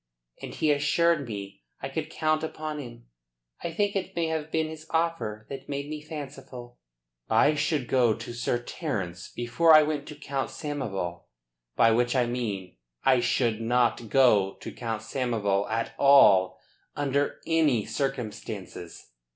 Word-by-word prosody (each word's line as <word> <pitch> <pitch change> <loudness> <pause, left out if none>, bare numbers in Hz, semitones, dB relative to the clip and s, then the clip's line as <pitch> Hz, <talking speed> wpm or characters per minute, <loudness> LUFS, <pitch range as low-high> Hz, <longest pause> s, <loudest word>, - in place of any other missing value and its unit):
And - - -7
he 155 - +2
assured 150 +1 +2
me 100 -2 -7 0.2
I - - -4
could - - -4
count 155 0 0
upon 155 -1 -4
him. - - -10 0.6
I 170 - -2
think 205 +4 0
it 190 -2 -3
may 165 -1 0
have 160 -1 -3
been 160 0 0
his 160 0 -9
offer 160 -11 -1
that 135 0 -8
made 140 0 -4
me 155 -1 -5
fanciful." 135 -5 -9 0.5
"I 130 +7 +4
should 150 -3 0
go 120 -4 +3
to 120 +1 -8
Sir 120 0 -1
Terence 95 - -4
before 155 +7 +4
I 155 - +8
went 150 -1 -2
to 150 - -8
Count 140 -2 -3
Samoval. 100 - -4 0.5
By 115 - +5
which 120 +3 +2
I 125 -2 +3
mean 105 - -4 0.3
that - - +6
I 130 - +4
should 115 -2 +1
not 120 -1 +1
go 105 -8 +4
to - - -6
Count 115 -3 -4
Samoval 105 -7 -1
at 115 +1 -2
all 100 -10 +6 0.4
under 145 0 0
any 155 -9 +2
circumstances. 105 - -5
130 Hz, 155 wpm, -27 LUFS, 110-150 Hz, 0.6 s, I